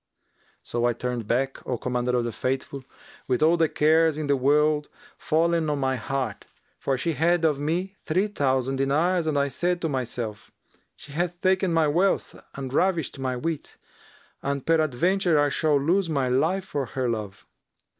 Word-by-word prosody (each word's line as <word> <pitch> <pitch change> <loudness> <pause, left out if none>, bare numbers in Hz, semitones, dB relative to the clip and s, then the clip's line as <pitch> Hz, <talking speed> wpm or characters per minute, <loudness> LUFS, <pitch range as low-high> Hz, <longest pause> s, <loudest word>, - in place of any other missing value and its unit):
So 120 0 -1
I 120 - +2
turned 120 -2 -4
back, 135 +4 0
O 125 - -1
Commander 125 +1 -1
of 120 - +1
the 120 - -2
Faithful, 130 +4 -3 0.4
with 130 +2 +1
all 165 +2 +5
the 165 -2 +2
cares 160 0 +3
in 155 - -2
the 140 0 +2
world 150 +3 +2 0.3
fallen 165 0 +1
on 145 - 0
my 130 -1 0
heart, 130 -2 -3 0.3
for 135 -1 0
she 165 +6 -1
had 165 +3 +2
of 150 -3 +2
me 180 +6 -2
three 185 +6 +1
thousand 135 -8 0
dinars, 160 +6 +1
and 150 -2 +1
I 140 0 +2
said 175 +5 -1
to 165 - +1
myself, 120 -5 -4 0.5
'She 145 - -12
hath 175 +3 -2
taken 190 0 +2
my 165 -2 +3
wealth 180 +6 +1 0.2
and 135 -1 -6
ravished 165 -4 0
my 130 -1 -1
wit, 155 +4 -4 0.6
and 140 -1 -3
peradventure 165 +2 +2
I 145 0 +3
shall 150 0 +2
lose 170 +5 +1
my 135 -5 0
life 160 +9 +1
for 145 -7 -3
her 130 +2 -2
love.' 110 -4 -4
145 Hz, 175 wpm, -25 LUFS, 130-165 Hz, 0.6 s, all